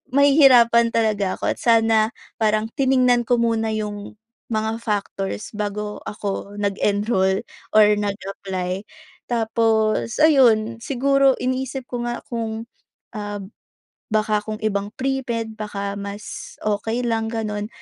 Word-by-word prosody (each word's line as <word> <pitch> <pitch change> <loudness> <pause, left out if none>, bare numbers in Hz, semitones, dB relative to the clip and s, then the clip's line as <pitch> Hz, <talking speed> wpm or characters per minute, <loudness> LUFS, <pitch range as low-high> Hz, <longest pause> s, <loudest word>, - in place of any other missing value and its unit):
mahihirapan 260 -5 +6
talaga 210 -4 +1
ako - - +1
at - - -6
sana 225 -1 +3 0.3
parang 215 0 +1
tiningnan 255 -3 +3
ko 245 - +4
muna 225 -1 +1
'yong 205 -1 -5 0.4
mga 220 0 -1
factors 205 -1 -3
bago 210 0 -4
ako 200 -1 -5
nag-enroll 200 -1 +1 0.3
or 215 -1 +8
nag-apply. 195 -2 -3 0.5
Tapos 225 -1 +1
ayun, 235 -7 +4
siguro 275 +1 +3
iniisip 260 +1 -2
ko 245 -1 -5
nga 240 0 -2
kung, 225 -1 -4 0.5
ah, 205 -2 -4 0.8
baka 215 -1 +1
kung 215 0 -5
ibang 205 -1 -1
premed, 250 -4 -2
baka 200 -2 -4
mas 200 +1 -7
okey 225 +4 -1
lang 225 -1 0
gano'n. 210 -2 -3
220 Hz, 115 wpm, -22 LUFS, 205-235 Hz, 0.8 s, or